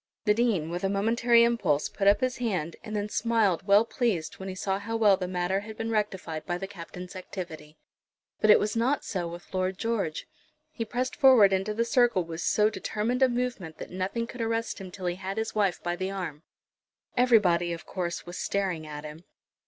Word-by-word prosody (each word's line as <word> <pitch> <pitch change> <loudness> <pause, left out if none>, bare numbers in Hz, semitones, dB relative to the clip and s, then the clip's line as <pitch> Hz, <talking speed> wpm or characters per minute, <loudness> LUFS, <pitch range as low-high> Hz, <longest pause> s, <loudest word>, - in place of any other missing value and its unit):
The 210 - +5
Dean, 210 -9 +1
with 175 +2 -4
a 195 - +2
momentary 230 +4 +4
impulse, 195 -11 +2
put 195 - -2
up 200 - +5
his 255 0 0
hand, 185 -10 -2
and 215 - -6
then 205 0 -1
smiled 210 -4 +1
well 200 +3 +6
pleased 225 -9 -1
when 190 0 -5
he 185 - -5
saw 190 +1 -1
how 225 +3 -3
well 210 -3 +5
the 185 -1 -4
matter 180 +1 0
had 215 +1 -9
been 225 0 -3
rectified 190 -7 -2
by 175 - -1
the 195 - -5
Captain's 180 -1 -9
activity. 165 -5 -8 0.6
But 215 - +2
it - - +9
was 210 +1 -1
not 255 +5 +1
so 180 -4 -2
with 175 +2 -10
Lord 185 0 -1
George. 205 -9 -2 0.5
He 230 -6 -4
pressed 250 +3 -2
forward 245 -8 +6
into 195 +3 0
the 230 +1 +1
circle 240 -7 +3
with 165 0 -6
so 210 +4 +3
determined 220 +3 -2
a 260 - +6
movement 240 -10 -3
that - - -8
nothing 190 +6 -2
could 240 +1 -8
arrest 225 -2 -2
him 190 - -7
till 185 0 -8
he 175 0 -1
had 195 +1 -5
his 220 0 -2
wife 200 -4 0
by 175 0 -1
the 185 +2 -3
arm. 180 -6 -5 0.7
Everybody, 200 -9 +4
of 170 - -6
course, 175 -2 -4
was 175 +1 -7
staring 185 -6 -1
at 150 -1 -7
him. 155 +3 -10
195 Hz, 205 wpm, -28 LUFS, 180-225 Hz, 0.7 s, it